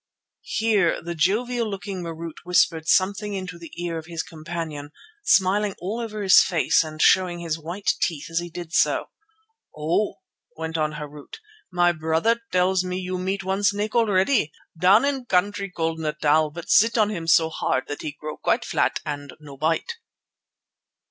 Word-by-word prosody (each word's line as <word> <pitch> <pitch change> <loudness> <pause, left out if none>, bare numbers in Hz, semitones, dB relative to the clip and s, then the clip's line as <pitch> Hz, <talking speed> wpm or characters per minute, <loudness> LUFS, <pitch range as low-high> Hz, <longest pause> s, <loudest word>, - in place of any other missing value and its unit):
Here 210 -6 +2
the 170 +1 -5
jovial 220 +8 0
looking 195 -2 -5
Marût 165 -1 -6
whispered 165 -2 +2
something 200 +3 +2
into 180 -2 -6
the 165 -2 -11
ear 170 -1 -3
of 160 - -12
his 165 -1 -4
companion, 160 -2 -6 0.3
smiling 200 - +3
all 205 +6 -3
over 215 -3 -4
his 190 -2 +8
face 165 -1 +2
and 155 -1 -9
showing 180 +1 +4
his 165 -2 -3
white 175 +6 -1
teeth 155 -4 -1
as 165 - +1
he 175 0 -6
did 170 0 -8
so. - - +2 0.7
"Oh!" 170 +7 0 0.4
went 160 0 -4
on 155 -1 0
Harût, 150 -1 -9 0.4
"my 175 -1 +3
brother 165 +8 0
tells 185 0 +2
me 180 0 -3
you 185 0 -3
meet 195 +2 -2
one 190 +2 -1
snake 205 +1 +1
already, 205 - +2 0.2
down 190 +9 +5
in 275 -3 -1
country 200 0 0
called 165 -2 -2
Natal, 150 0 +2
but 165 +3 -9
sit 230 +2 +5
on 215 -1 +3
him 170 -5 -5
so 160 0 +5
hard, - - -1
that 145 - -5
he 150 - -5
grow 155 0 -6
quite - - 0
flat - - 0
and 145 -2 -5
no 145 -2 -11
bite." 165 - -1
175 Hz, 170 wpm, -24 LUFS, 160-200 Hz, 0.7 s, his